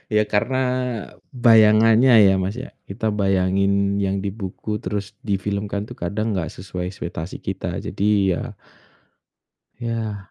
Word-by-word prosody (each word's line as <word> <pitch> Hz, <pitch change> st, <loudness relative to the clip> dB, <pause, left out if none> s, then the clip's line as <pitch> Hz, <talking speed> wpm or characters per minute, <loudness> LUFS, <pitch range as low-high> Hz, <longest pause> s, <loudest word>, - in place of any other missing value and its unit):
Ya 105 Hz, -, +5 dB
karena 115 Hz, +6 st, 0 dB, 0.7 s
bayangannya 115 Hz, 0 st, +5 dB
ya, 100 Hz, -3 st, +7 dB
Mas, 95 Hz, +5 st, -3 dB
ya, 130 Hz, -, -8 dB, 0.2 s
kita 110 Hz, +2 st, -2 dB
bayangin 100 Hz, 0 st, +1 dB
yang 95 Hz, 0 st, -1 dB
di 100 Hz, -, -2 dB
buku 105 Hz, +1 st, -5 dB
terus 100 Hz, +1 st, -4 dB
di 100 Hz, -3 st, -1 dB
film 100 Hz, +1 st, -3 dB
kan 100 Hz, 0 st, -3 dB
tuh 120 Hz, -, -9 dB
kadang 105 Hz, +3 st, -2 dB
nggak 85 Hz, -5 st, -2 dB
sesuai 90 Hz, 0 st, -6 dB
ekspektasi 85 Hz, -2 st, -6 dB
kita, 90 Hz, -2 st, -4 dB
jadi 100 Hz, +1 st, -2 dB, 0.3 s
ya 90 Hz, -, -3 dB, 1.4 s
ya. 110 Hz, -4 st, -4 dB
100 Hz, 140 wpm, -22 LUFS, 95-110 Hz, 1.4 s, ya